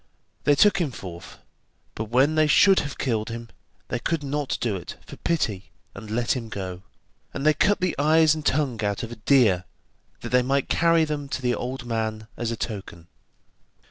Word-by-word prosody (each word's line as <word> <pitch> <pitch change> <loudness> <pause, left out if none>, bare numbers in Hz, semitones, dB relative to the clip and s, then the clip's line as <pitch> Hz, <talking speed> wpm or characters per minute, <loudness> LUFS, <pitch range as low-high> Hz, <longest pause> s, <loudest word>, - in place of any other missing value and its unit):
They 145 0 +5
took 195 +4 +4
him 160 - 0
forth, 90 -7 -9 0.6
but 110 - -4
when 130 +7 +3
they 155 -1 +3
should 190 +6 +6
have 140 -1 -5
killed 110 -5 -1
him, 115 0 -7 0.4
they 125 - -2
could 160 +4 -1
not 145 0 -2
do 115 -4 -1
it 90 - -7
for - - -10
pity, 110 - -1 0.2
and 110 - -10
let 115 +4 0
him 115 -3 -5
go, 95 -4 -5 0.5
and 140 - -3
they 155 - +6
cut 205 +7 +2
the 185 -1 0
eyes 155 +1 +5
and 155 -1 -5
tongue 130 -7 0
out 100 +1 -1
of 115 - -6
a - - -6
deer 110 -6 +3 0.6
that - - -5
they 125 0 +4
might 135 +2 0
carry 165 -1 +3
them 145 -2 -4
to 130 - -3
the 125 -1 +2
old 125 +1 -4
man 110 -2 -3
as 120 - -3
a 115 - -3
token. 95 -7 -6
125 Hz, 195 wpm, -25 LUFS, 110-150 Hz, 0.6 s, should